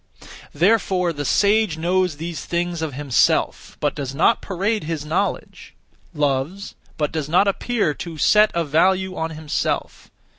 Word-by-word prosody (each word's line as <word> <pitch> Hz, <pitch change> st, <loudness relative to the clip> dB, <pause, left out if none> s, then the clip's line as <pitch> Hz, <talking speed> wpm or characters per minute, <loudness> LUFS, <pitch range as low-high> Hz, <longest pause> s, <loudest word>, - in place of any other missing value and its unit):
Therefore 180 Hz, 0 st, +2 dB
the 145 Hz, -1 st, -5 dB
sage 205 Hz, 0 st, +2 dB
knows 180 Hz, 0 st, 0 dB
(these 165 Hz, +1 st, -5 dB
things) 175 Hz, -1 st, -2 dB
of 155 Hz, -5 st, -4 dB
himself, 140 Hz, -3 st, 0 dB
but -, -, 0 dB
does 135 Hz, -1 st, -5 dB
not 180 Hz, +9 st, +3 dB
parade 200 Hz, 0 st, -2 dB
(his 160 Hz, -2 st, -4 dB
knowledge); 175 Hz, +6 st, -3 dB, 0.4 s
loves, 150 Hz, +5 st, -2 dB, 0.2 s
but 150 Hz, -2 st, -1 dB
does 155 Hz, -2 st, -3 dB
not 180 Hz, +5 st, +4 dB
(appear 205 Hz, -4 st, 0 dB
to 165 Hz, +1 st, -8 dB
set 210 Hz, +7 st, +5 dB
a) 170 Hz, -, +1 dB
value 185 Hz, +5 st, +1 dB
on, 160 Hz, -2 st, -2 dB
himself. 155 Hz, -2 st, -3 dB
170 Hz, 145 wpm, -21 LUFS, 150-190 Hz, 0.4 s, set